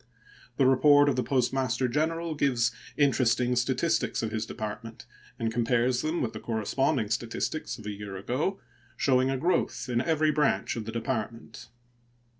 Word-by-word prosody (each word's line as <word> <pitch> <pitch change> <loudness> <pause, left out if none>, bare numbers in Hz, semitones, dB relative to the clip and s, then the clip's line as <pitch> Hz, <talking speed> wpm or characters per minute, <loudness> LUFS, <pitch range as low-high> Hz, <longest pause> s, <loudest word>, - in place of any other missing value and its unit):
The 135 - +4
report 145 +2 +6
of 135 - +1
the 125 - +1
Postmaster 130 -1 0
General 160 +5 -1
gives 125 -5 +1 0.3
interesting 125 -3 +2
statistics 130 +4 0
of 110 - -2
his 110 0 -3
Department, 110 +1 -7 0.3
and 115 -1 -2
compares 120 +1 +1
them 155 +1 -1
with 115 - -3
the - - -6
corresponding 115 +1 -1
statistics 120 +7 -2
of 110 - -12
a 105 - -3
year 100 -1 -7
ago, 130 - -2 0.4
showing 130 -1 +3
a 135 - 0
growth 130 -6 0
in 120 -1 +1
every 155 +1 +2
branch 150 -1 +1
of 115 -2 -5
the 110 - -5
Department. 115 -1 -4
125 Hz, 155 wpm, -28 LUFS, 115-140 Hz, 0.4 s, report